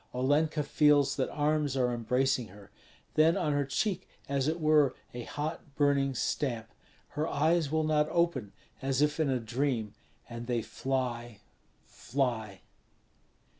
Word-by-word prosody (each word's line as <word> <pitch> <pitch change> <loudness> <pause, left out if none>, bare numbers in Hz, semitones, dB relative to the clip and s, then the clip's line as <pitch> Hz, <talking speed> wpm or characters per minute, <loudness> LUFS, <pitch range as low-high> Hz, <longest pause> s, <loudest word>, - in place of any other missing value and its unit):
Olenka 150 +4 +2
feels 145 -1 +3
that - - 0
arms 150 -2 0
are 125 -1 +2
embracing 125 +1 +1
her; 100 +1 -15 0.4
then 160 +2 +4
on 155 -4 0
her 145 -1 +1
cheek 185 +7 -1 0.2
as 140 0 0
it 160 +2 0
were 155 -3 +4 0.2
a 120 - -5
hot 150 -1 -5
burning 140 -2 +2
stamp. 115 -3 -2 0.4
Her 150 +2 -2
eyes 160 +1 +2
will 160 0 +1
not 155 -1 +2
open, 170 - 0 0.3
as 135 +1 +1
if 150 +1 0
in 155 -3 +2
a 130 -1 +1
dream; 115 -2 -1 0.3
and 120 0 -7
they 120 -3 0
fly, 120 -4 -3 0.4
fly. 115 -7 -3
140 Hz, 140 wpm, -30 LUFS, 120-150 Hz, 0.4 s, then